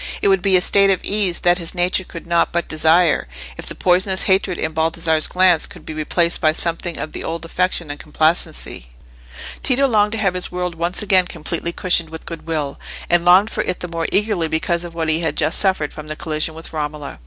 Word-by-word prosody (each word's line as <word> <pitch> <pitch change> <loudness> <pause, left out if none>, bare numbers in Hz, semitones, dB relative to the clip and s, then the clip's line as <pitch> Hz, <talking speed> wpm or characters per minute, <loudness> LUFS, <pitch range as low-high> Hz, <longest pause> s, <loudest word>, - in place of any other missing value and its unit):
It - - +2
would 195 -2 +3
be 190 0 +4
a - - +2
state 200 +1 +4
of 190 - +2
ease 200 -4 0
that 175 +1 +3
his 170 +1 -2
nature 180 +1 +1
could 170 -2 -10
not 170 0 +1
but 170 0 -1
desire, 160 - +3 0.3
if - - -9
the - - -5
poisonous 185 +1 +2
hatred 190 -2 +1
in 160 - -2
Baldassarre's 160 0 +1
glance 180 -3 +3
could - - -14
be 160 - -6
replaced 170 +2 0
by 155 -1 +3
something 170 +1 -3
of 155 - -5
the - - -6
old 165 0 -4
affection 175 -2 -1
and 145 - -8
complacency. 155 - -1 0.7
Tito 270 +1 +2
longed 210 -3 +2
to - - -2
have 195 -4 +1
his 180 0 -2
world 180 -1 -3
once 170 +5 0
again 185 -3 +3
completely 170 +1 -3
cushioned 170 -2 +1
with 160 0 -8
goodwill, 160 -4 -4 0.3
and 175 0 +4
longed 185 +5 +5
for - - -1
it 180 - -3
the 180 - -1
more 165 -1 -3
eagerly 205 -5 +1
because 170 +2 -1
of 170 -1 -9
what 165 -1 -1
he 155 +1 +2
had 165 -1 -2
just 160 - 0
suffered 190 -7 0
from 155 0 -9
the 155 - -4
collision 155 0 -2
with 165 0 -9
Romola. 150 - -5
170 Hz, 220 wpm, -19 LUFS, 160-185 Hz, 0.7 s, longed